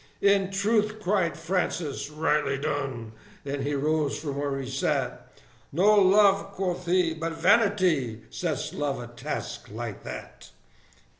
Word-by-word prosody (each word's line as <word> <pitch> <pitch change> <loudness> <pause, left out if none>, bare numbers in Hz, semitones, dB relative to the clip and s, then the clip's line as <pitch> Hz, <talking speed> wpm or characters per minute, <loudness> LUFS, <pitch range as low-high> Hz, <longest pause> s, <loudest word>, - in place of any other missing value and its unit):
"In 200 -1 +4
truth!" 215 +2 +1
cried 185 -5 0
Francis, 165 -4 -2
"rightly 150 -2 +1
done!" 135 -6 -3 0.3
and 140 0 -3
he 145 +2 -1
rose 150 +1 0
from 145 -2 -4
where 140 -1 -1
he 135 - -5
sat: 135 +1 -2 0.4
"No 190 +8 +4
love," 200 0 +5
quoth 180 -2 -3
he, 175 -2 +3
"but 165 +1 -3
vanity, 180 - +3
sets 165 -6 -3
love 145 -3 -2
a 120 - -6
task - - -5
like - - -6
that!" - - -9
165 Hz, 135 wpm, -27 LUFS, 140-195 Hz, 0.4 s, love